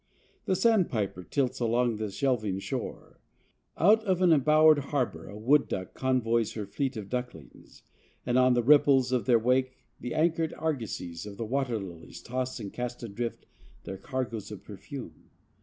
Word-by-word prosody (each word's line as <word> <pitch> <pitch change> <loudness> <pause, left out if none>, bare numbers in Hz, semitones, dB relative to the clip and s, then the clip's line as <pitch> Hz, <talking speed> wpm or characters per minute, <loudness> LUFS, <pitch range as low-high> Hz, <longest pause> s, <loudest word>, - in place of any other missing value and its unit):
The 190 - +1
sandpiper 170 - +1
tilts 130 +4 -1
along 120 -1 +1
the 110 -1 -3
shelving 110 -4 0
shore. 95 - -6 0.6
Out 215 +6 +5
of 190 -4 +1
an 175 -2 +6
embowered 155 +1 +5
harbor 140 -3 -2
a 100 - -9
wood 135 +7 +3
duck 95 -1 -4
convoys 115 -4 0
her 105 -2 -4
fleet 130 +6 -3
of 105 -3 -6
ducklings, 125 - -7 0.4
and 125 - 0
on 130 0 +5
the 120 - +2
ripples 140 -2 +5
of 125 -2 0
their 120 -2 +6
wake 130 +3 +1 0.2
the 125 - -5
anchored 165 0 +1
argosies 110 - -4
of 100 -1 -9
the 115 - -3
water 125 0 -1
lilies 90 -5 -9
toss 130 +1 -3
and 100 -3 -7
cast 125 0 -5
adrift 115 +2 -5 0.4
their 95 - -7
cargoes 120 -1 -4
of - - -9
perfume. - - -10
125 Hz, 160 wpm, -28 LUFS, 110-140 Hz, 0.6 s, an